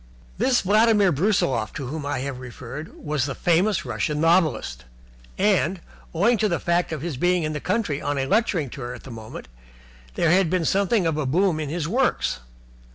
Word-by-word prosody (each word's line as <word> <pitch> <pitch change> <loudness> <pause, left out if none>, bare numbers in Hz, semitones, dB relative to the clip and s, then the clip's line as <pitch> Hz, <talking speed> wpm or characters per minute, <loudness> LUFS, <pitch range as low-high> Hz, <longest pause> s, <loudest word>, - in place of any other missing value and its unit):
This 255 -2 +3
Vladimir 210 -1 +4
Brusiloff 145 - +1
to 140 -2 -5
whom 145 +2 -5
I 145 -3 -2
have 135 -1 -4
referred 130 +4 -9
was 150 -3 -2
the 135 - -4
famous 180 +4 +1
Russian 150 -1 -2
novelist, 155 - +1 0.5
and, 190 -2 +2 0.3
owing 210 +7 +2
to 215 - +2
the 170 - +1
fact 175 0 0
of 155 -2 -4
his 165 -6 -4
being 175 +3 +2
in 155 0 -2
the 150 - -3
country 185 -5 -1
on 145 0 -2
a 135 - 0
lecturing 175 - +1
tour 125 -3 -6
at - - -13
the 135 - -10
moment, 110 - -9 0.7
there 165 - +2
had 185 -1 +3
been 180 -1 0
something 200 +1 +2
of 160 -2 0
a 150 -3 -1
boom 175 +3 +2
in 150 -2 -3
his 160 0 -2
works. 245 - 0
165 Hz, 190 wpm, -24 LUFS, 140-190 Hz, 0.7 s, Vladimir